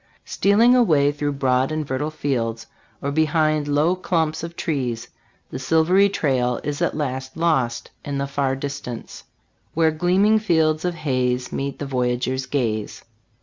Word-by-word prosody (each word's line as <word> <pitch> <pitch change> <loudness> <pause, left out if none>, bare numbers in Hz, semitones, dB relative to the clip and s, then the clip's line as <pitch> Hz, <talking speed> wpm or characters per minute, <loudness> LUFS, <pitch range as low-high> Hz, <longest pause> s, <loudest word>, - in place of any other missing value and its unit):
Stealing 225 +5 +4
away 155 - +4
through 145 0 -2
broad 130 0 +1
and 155 -2 -2
fertile 130 +3 -2
fields, 120 -7 -2 0.4
or 140 - -1
behind 155 0 +1
low 150 +5 +2
clumps 165 -4 -1
of 170 +1 -7
trees, 125 -9 -3 0.4
the - - -5
silvery 170 +7 +3
trail 130 -9 0
is 145 0 -3
at - - 0
last 130 -1 -4
lost 155 -8 0
in 140 -1 -3
the 140 - -1
far 140 -1 -1
distance, 135 -4 -7 0.2
" - - -43
Where 160 0 +3
gleaming 185 +7 +3
fields 160 -5 +1
of 175 -1 -1
haze 130 -5 -1
Meet 140 0 -3
the 145 - -5
voyageur's 125 0 -1
gaze.' 115 -6 -2
145 Hz, 150 wpm, -22 LUFS, 130-160 Hz, 0.4 s, Stealing